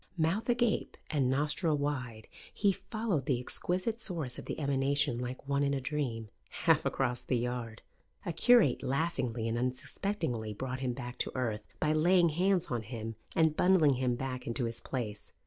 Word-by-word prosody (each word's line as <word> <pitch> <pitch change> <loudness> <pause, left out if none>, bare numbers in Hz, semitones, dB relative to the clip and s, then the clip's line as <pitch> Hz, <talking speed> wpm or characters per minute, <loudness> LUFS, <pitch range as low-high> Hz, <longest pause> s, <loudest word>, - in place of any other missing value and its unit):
Mouth 170 +9 0
agape 240 -2 +1
and 140 -4 +2
nostril 150 +3 +1
wide, 125 -7 -3 0.2
he 200 -1 +2
followed 195 - -2
the 130 -5 +2
exquisite 185 - -1
source 160 - -1
of - - -9
the - - -4
emanation 140 -3 +1
like 125 +2 -5
one 140 0 +1
in 140 0 +2
a - - -1
dream, 125 -5 -3 0.4
half - - +4
across 125 -2 0
the 125 - 0
yard. 120 -2 -4 0.4
A 170 - -2
curate 220 - +5
laughingly 130 -5 -1
and 115 +1 -1
unsuspectingly 125 - -2
brought 130 +3 -4
him 130 -2 -1
back 125 -1 -7
to - - -1
earth 115 -5 -1 0.2
by 155 0 +2
laying 170 +2 +4
hands 180 +3 +2
on 120 -2 0
him 115 0 -6 0.2
and 160 -2 +3
bundling 180 -6 +5
him 125 -1 0
back 130 0 -4
into 120 +1 -1
his 115 0 -3
place. 110 -6 -5
135 Hz, 170 wpm, -32 LUFS, 125-165 Hz, 0.4 s, curate